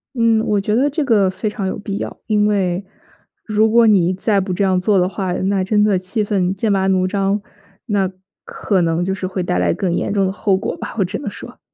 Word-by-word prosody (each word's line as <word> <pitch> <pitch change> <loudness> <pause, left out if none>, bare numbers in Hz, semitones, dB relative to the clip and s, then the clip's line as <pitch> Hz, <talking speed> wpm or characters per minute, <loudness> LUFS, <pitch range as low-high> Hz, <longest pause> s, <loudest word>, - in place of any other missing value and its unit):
嗯， 230 -2 +2
我 210 -1 +1
觉 210 +2 -1
得 270 +5 +2
这 295 +1 -1
个 210 -7 +3
非 200 +3 -3
常 210 -2 -3
有 - - -4
必 200 -1 -4
要， - - -6
因 210 -1 +2
为 190 -2 0 0.6
如 215 0 +2
果 235 +1 +5
你 185 -5 +4
再 200 +2 +1
不 190 0 -3
这 190 +3 0
样 190 -1 +2
做 200 +1 +2
的 180 0 +2
话， 185 -1 -3
那 190 +2 0
真 210 +2 +2
的 210 -2 +3
气 185 +4 -1
氛 190 -3 0
剑 205 +2 0
拔 190 -1 +1
弩 185 -1 +2
张， 195 +1 0 0.5
那 200 -5 0 0.3
可 195 -3 -1
能 165 0 +1
就 190 +1 -1
是 185 -1 -4
会 185 0 -4
带 90 - -1
来 90 -1 +2
更 180 - -1
严 - - -1
重 200 -2 +2
的 190 - -1
后 195 -1 +1
果 - - -3
吧， - - -7
我 195 - +3
只 180 - -4
能 - - -5
说。 - - -11
195 Hz, 260 characters per minute, -18 LUFS, 185-210 Hz, 0.6 s, 果